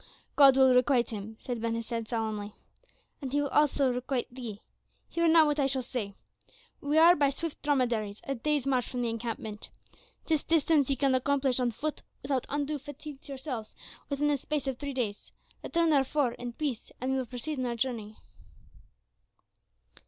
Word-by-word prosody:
"God 275 Hz, -2 st, +7 dB
will 265 Hz, -1 st, +6 dB
requite 250 Hz, -1 st, +3 dB
him," 220 Hz, +1 st, -6 dB
said 240 Hz, -3 st, -4 dB
Ben 230 Hz, 0 st, -1 dB
Hesed 230 Hz, 0 st, -3 dB
solemnly; 215 Hz, -3 st, -3 dB, 0.7 s
"and 265 Hz, -2 st, -4 dB
he 290 Hz, -, +2 dB
will 285 Hz, -1 st, 0 dB
also 280 Hz, -3 st, +3 dB
requite 250 Hz, 0 st, -2 dB
thee. 230 Hz, -5 st, -7 dB, 0.4 s
Hear 335 Hz, 0 st, +1 dB
now 325 Hz, -1 st, +7 dB
what 295 Hz, 0 st, 0 dB
I 275 Hz, -, +3 dB
shall 265 Hz, -1 st, -1 dB
say. 225 Hz, -5 st, -4 dB, 0.7 s
We 295 Hz, 0 st, 0 dB
are 335 Hz, +2 st, +8 dB
by 285 Hz, -3 st, +3 dB
swift 310 Hz, +3 st, -5 dB
dromedaries 240 Hz, -8 st, 0 dB
a 275 Hz, -, -2 dB
day's 290 Hz, +2 st, 0 dB
march 255 Hz, -3 st, +1 dB
from 245 Hz, -1 st, -2 dB
the 235 Hz, -, 0 dB
encampment; 225 Hz, -2 st, -5 dB, 0.6 s
this 315 Hz, -3 st, +1 dB
distance 310 Hz, -3 st, +3 dB
ye 275 Hz, -, +3 dB
can 275 Hz, -1 st, +2 dB
accomplish 265 Hz, 0 st, +2 dB
on 250 Hz, -1 st, +2 dB
foot 295 Hz, +7 st, -4 dB, 0.2 s
without 270 Hz, -2 st, -1 dB
undue 290 Hz, +1 st, -1 dB
fatigue 290 Hz, 0 st, -9 dB
to -, -, -15 dB
yourselves 260 Hz, -5 st, -6 dB, 0.3 s
within 290 Hz, +1 st, +1 dB
the 290 Hz, -, +2 dB
space 295 Hz, +1 st, -2 dB
of 265 Hz, -2 st, -3 dB
three 285 Hz, -1 st, -4 dB
days. 215 Hz, -6 st, -3 dB, 0.3 s
Return, 335 Hz, -1 st, +2 dB
therefore, 275 Hz, -2 st, +2 dB
in 240 Hz, 0 st, -6 dB
peace, 270 Hz, -4 st, -4 dB
and 255 Hz, +2 st, -1 dB
we 265 Hz, -, +1 dB
will 255 Hz, -, -3 dB
proceed 260 Hz, +4 st, -4 dB
on 255 Hz, -, -1 dB
our 240 Hz, -, -2 dB
journey." 225 Hz, -3 st, -3 dB
265 Hz, 180 wpm, -29 LUFS, 235-290 Hz, 0.7 s, are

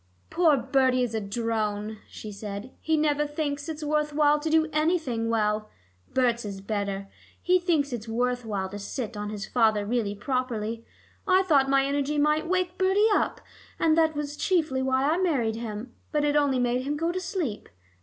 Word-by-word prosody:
"Poor 325 Hz, -4 st, +4 dB
Bertie 260 Hz, 0 st, +2 dB
is 235 Hz, -2 st, -2 dB
a 220 Hz, -, -1 dB
drone," 215 Hz, 0 st, -2 dB
she 215 Hz, -, -8 dB
said; 205 Hz, +3 st, -7 dB
"he 320 Hz, 0 st, +1 dB
never 295 Hz, -1 st, +1 dB
thinks 290 Hz, 0 st, -3 dB
it 310 Hz, -1 st, -5 dB
worth 300 Hz, 0 st, 0 dB
while 295 Hz, 0 st, +4 dB
to 315 Hz, +2 st, -2 dB
do 320 Hz, 0 st, +3 dB
anything 305 Hz, -8 st, +1 dB
well. 215 Hz, -1 st, 0 dB, 0.4 s
Berts 240 Hz, -2 st, +1 dB
is 200 Hz, -2 st, -6 dB
better: 200 Hz, -1 st, -3 dB, 0.3 s
he 365 Hz, 0 st, +3 dB
thinks 315 Hz, -6 st, +1 dB
it 230 Hz, -1 st, -5 dB
worth 245 Hz, +2 st, 0 dB
while 200 Hz, -4 st, -2 dB
to 205 Hz, +2 st, -7 dB
sit 215 Hz, +3 st, -5 dB
on 210 Hz, 0 st, -4 dB
his 210 Hz, -2 st, -5 dB
father 220 Hz, -4 st, +2 dB
really 215 Hz, -2 st, -1 dB
properly. 230 Hz, -1 st, -2 dB, 0.4 s
I 375 Hz, 0 st, +5 dB
thought 280 Hz, -7 st, +3 dB
my 275 Hz, 0 st, +4 dB
energy 285 Hz, +1 st, 0 dB
might 300 Hz, +2 st, +2 dB
wake 365 Hz, 0 st, -1 dB
Bertie 390 Hz, +3 st, +4 dB
up, -, -, 0 dB, 0.4 s
and 320 Hz, -1 st, +3 dB
that 320 Hz, -1 st, +3 dB
was 290 Hz, 0 st, -3 dB
chiefly 305 Hz, -6 st, +1 dB
why 260 Hz, 0 st, +1 dB
I 315 Hz, +3 st, +2 dB
married 255 Hz, -12 st, +1 dB
him. 230 Hz, +1 st, -6 dB, 0.2 s
But 300 Hz, -1 st, +1 dB
it 295 Hz, 0 st, +1 dB
only 285 Hz, -3 st, +3 dB
made 245 Hz, 0 st, +1 dB
him 290 Hz, +3 st, -2 dB
go 330 Hz, +3 st, 0 dB
to 370 Hz, -, -2 dB
sleep. 335 Hz, -, -3 dB
265 Hz, 185 wpm, -27 LUFS, 220-305 Hz, 0.4 s, I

